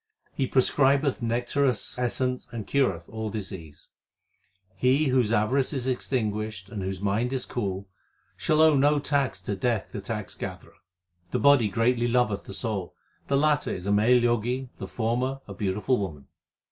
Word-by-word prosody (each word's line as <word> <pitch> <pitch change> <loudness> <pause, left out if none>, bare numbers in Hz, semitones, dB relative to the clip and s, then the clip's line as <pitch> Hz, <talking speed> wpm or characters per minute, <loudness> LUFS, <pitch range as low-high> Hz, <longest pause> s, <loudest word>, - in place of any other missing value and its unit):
He 135 - -1
prescribeth 135 +1 +3
nectareous 120 +2 0
essence 125 +1 -1
and 115 -3 -5
cureth 100 -12 0
all 110 -1 -4
diseases. 95 -8 -8 0.9
He 130 +7 +2
whose 125 -4 +2
avarice 130 +7 +2
is 130 -3 -2
extinguished 110 -6 -2
and 105 -4 -5
whose 95 0 -3
mind 105 +5 0
is 130 -2 -1
cool, 100 -4 -3 0.5
shall 155 0 +2
owe 160 -2 +6
no 145 +2 +4
tax 140 -8 0
to 100 - -2
Death 115 0 -1
the 100 - -5
tax 105 0 -5
gatherer. - - -7 0.6
The - - -1
body 125 -1 +5
greatly 120 +4 +1
loveth 120 -4 +1
the - - -8
soul; 100 -7 -3 0.3
The 140 - +2
latter 150 0 +2
is 90 - -7
a 100 - 0
male 110 +5 +5
Jogi, 120 +2 0
the - - -5
former 125 +4 -1
a 100 - -7
beautiful 105 +6 0
woman. 80 -9 -5
120 Hz, 160 wpm, -26 LUFS, 105-130 Hz, 0.9 s, owe